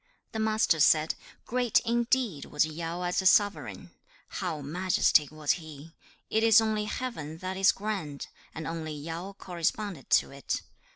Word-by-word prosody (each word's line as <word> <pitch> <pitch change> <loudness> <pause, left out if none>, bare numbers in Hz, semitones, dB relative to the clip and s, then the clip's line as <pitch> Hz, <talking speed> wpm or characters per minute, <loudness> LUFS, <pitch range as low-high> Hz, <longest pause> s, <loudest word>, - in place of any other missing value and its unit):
The 220 - -4
Master 220 -6 +2
said, 155 +1 +4 0.3
'Great 245 -2 +2
indeed 235 - 0
was 150 +1 +1
Yao 165 +3 -4
as 180 +1 0
a 190 - +3
sovereign! 205 +1 +2 0.4
How 175 -5 -3
majestic 155 -1 +2
was 155 -1 -1
he! 155 0 -11 0.3
It 220 - +1
is 225 -1 +7
only 215 -1 0
Heaven 210 - -5
that 185 +2 -4
is 195 0 +5
grand, 195 -9 -4 0.3
and 160 -1 -5
only 160 -1 -4
Yao 165 +6 -6
corresponded 180 -2 -3
to - - +3
it. 140 -1 -3
180 Hz, 150 wpm, -29 LUFS, 155-215 Hz, 0.4 s, is